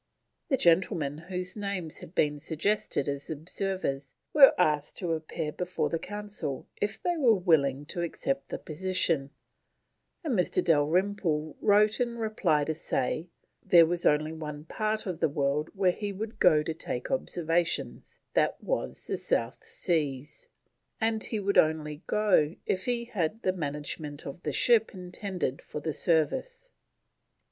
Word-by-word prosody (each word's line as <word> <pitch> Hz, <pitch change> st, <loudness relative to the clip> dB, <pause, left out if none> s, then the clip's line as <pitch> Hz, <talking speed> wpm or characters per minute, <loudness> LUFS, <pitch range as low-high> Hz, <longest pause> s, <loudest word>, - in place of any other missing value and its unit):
The 270 Hz, -, +3 dB
gentlemen 165 Hz, -, +2 dB
whose 180 Hz, +1 st, -4 dB
names 200 Hz, -6 st, -3 dB
had 165 Hz, -, -12 dB
been 150 Hz, -1 st, +2 dB
suggested 160 Hz, 0 st, 0 dB
as 140 Hz, 0 st, -3 dB
observers 160 Hz, -4 st, -3 dB, 0.2 s
were 280 Hz, -2 st, +8 dB
asked 150 Hz, -4 st, +1 dB
to 175 Hz, -3 st, -2 dB
appear 160 Hz, -1 st, -3 dB
before 180 Hz, +3 st, -2 dB
the 165 Hz, -, 0 dB
Council 205 Hz, -10 st, -4 dB
if 205 Hz, +1 st, -2 dB
they 350 Hz, -1 st, -1 dB
were 245 Hz, -7 st, +5 dB
willing 145 Hz, -7 st, +2 dB
to 175 Hz, -, -3 dB
accept 275 Hz, +11 st, -2 dB
the -, -, -3 dB
position, 165 Hz, -3 st, 0 dB, 0.9 s
and 305 Hz, -6 st, -1 dB
Mr. 180 Hz, -5 st, +1 dB
Dalrymple 160 Hz, 0 st, +1 dB
wrote 210 Hz, +1 st, +4 dB
in 235 Hz, -1 st, -1 dB
reply 215 Hz, -9 st, +1 dB
to 160 Hz, -, -1 dB
say 155 Hz, +2 st, -2 dB, 0.3 s
there 170 Hz, -2 st, +7 dB
was 175 Hz, +1 st, -2 dB
only 155 Hz, +1 st, +3 dB
one 150 Hz, -1 st, -7 dB
part 215 Hz, +4 st, -1 dB
of 180 Hz, -5 st, -4 dB
the -, -, +2 dB
world 140 Hz, +2 st, 0 dB
where 190 Hz, -2 st, +3 dB
he 205 Hz, +2 st, -4 dB
would 215 Hz, +3 st, -6 dB
go 155 Hz, -4 st, +5 dB
to 160 Hz, -, -3 dB
take 125 Hz, -5 st, -4 dB
observations, 170 Hz, -9 st, -1 dB
that -, -, +2 dB
was -, -, -3 dB
the -, -, -2 dB
South -, -, -1 dB
Seas, 150 Hz, -5 st, -1 dB, 0.5 s
and 220 Hz, -1 st, 0 dB
he 220 Hz, -, -2 dB
would 200 Hz, 0 st, +3 dB
only 155 Hz, -1 st, +1 dB
go 185 Hz, -7 st, +3 dB
if 185 Hz, -1 st, -1 dB
he 240 Hz, -1 st, -1 dB
had 215 Hz, -2 st, -2 dB
"the 185 Hz, -, +2 dB
management 150 Hz, -2 st, -4 dB
of 140 Hz, +5 st, -7 dB
the -, -, -2 dB
ship 225 Hz, -4 st, +3 dB
intended 180 Hz, -5 st, -4 dB
for -, -, -7 dB
the 155 Hz, +1 st, -3 dB
service." 330 Hz, -, 0 dB
175 Hz, 150 wpm, -29 LUFS, 150-205 Hz, 0.9 s, were